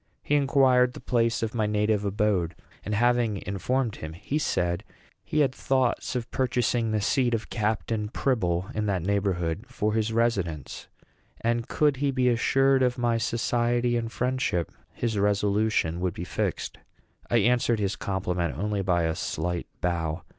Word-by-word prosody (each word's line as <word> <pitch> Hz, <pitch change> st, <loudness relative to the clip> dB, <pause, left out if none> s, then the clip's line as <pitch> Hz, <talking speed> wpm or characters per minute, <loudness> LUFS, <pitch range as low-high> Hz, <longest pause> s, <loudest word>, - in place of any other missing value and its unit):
He -, -, -1 dB
inquired 135 Hz, -3 st, +4 dB
the -, -, -9 dB
place 115 Hz, -1 st, +1 dB
of 110 Hz, -, -2 dB
my 110 Hz, -3 st, 0 dB
native 105 Hz, 0 st, +1 dB
abode; 100 Hz, -4 st, 0 dB, 0.3 s
and, 105 Hz, -, -2 dB
having 120 Hz, -3 st, +2 dB
informed 115 Hz, +4 st, -1 dB
him, 80 Hz, 0 st, -7 dB
he 105 Hz, -, -3 dB
said 90 Hz, -, 0 dB, 0.4 s
he 155 Hz, -, 0 dB
had 135 Hz, -3 st, +2 dB
thoughts 130 Hz, -1 st, 0 dB
of 120 Hz, -1 st, -3 dB
purchasing 120 Hz, -3 st, +1 dB
the 110 Hz, 0 st, +1 dB
seat 120 Hz, +3 st, +2 dB
of 110 Hz, -, -6 dB
Captain 110 Hz, -1 st, -1 dB
Pribble, 95 Hz, -6 st, 0 dB
in 105 Hz, 0 st, -1 dB
that 95 Hz, -4 st, 0 dB
neighborhood, 95 Hz, -1 st, -1 dB
for 110 Hz, -3 st, -1 dB
his 110 Hz, 0 st, 0 dB
residence; 95 Hz, -, -1 dB, 0.5 s
and 115 Hz, +1 st, 0 dB
could 145 Hz, -2 st, +2 dB
he 140 Hz, +1 st, +1 dB
be 130 Hz, -2 st, +2 dB
assured 135 Hz, +3 st, +3 dB
of 125 Hz, -1 st, +2 dB
my 120 Hz, -1 st, +1 dB
society 120 Hz, +1 st, +1 dB
and 115 Hz, -1 st, -2 dB
friendship, 125 Hz, -10 st, -1 dB, 0.2 s
his 110 Hz, -4 st, -2 dB
resolution 100 Hz, -3 st, +1 dB
would 90 Hz, -1 st, -1 dB
be 85 Hz, -, -5 dB
fixed. 90 Hz, -, -3 dB, 0.5 s
I 120 Hz, -, +3 dB
answered 120 Hz, +1 st, +3 dB
his 100 Hz, -1 st, 0 dB
compliment 90 Hz, -5 st, -2 dB
only 105 Hz, +2 st, -1 dB
by 90 Hz, -3 st, +1 dB
a 80 Hz, 0 st, +1 dB
slight 85 Hz, +2 st, -3 dB
bow. 85 Hz, -1 st, -1 dB
110 Hz, 160 wpm, -27 LUFS, 95-120 Hz, 0.5 s, inquired